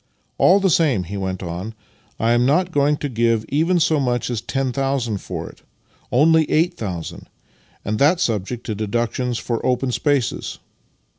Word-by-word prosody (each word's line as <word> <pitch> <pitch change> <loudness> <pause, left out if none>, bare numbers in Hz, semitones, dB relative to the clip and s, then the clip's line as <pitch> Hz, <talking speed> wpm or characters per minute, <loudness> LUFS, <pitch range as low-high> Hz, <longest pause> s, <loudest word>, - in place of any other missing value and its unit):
" - - -44
All 190 +2 +6
the 190 -2 +2
same," 140 - +2
he 95 +4 -7
went 95 -1 -3
on, 90 +6 -5 0.4
"I 115 +1 +2
am 120 +1 +3
not 180 +8 +2
going 145 -1 +2
to 145 - -3
give 115 -3 +1
even 165 +5 +2
so 155 -2 +2
much 125 -2 -1
as 115 -3 -2
10,000 135 -3 -1
for - - -6
it - - -14 0.3
— - - -35
only 160 +4 +4
8000 115 - -2 0.3
— - - -34
and 105 +1 -1
that 155 +5 +4
subject 115 - -2
to 110 - -2
deductions 120 +3 -2
for 115 0 -3
open 125 0 0
spaces. 140 -1 -1
125 Hz, 170 wpm, -21 LUFS, 110-145 Hz, 0.4 s, All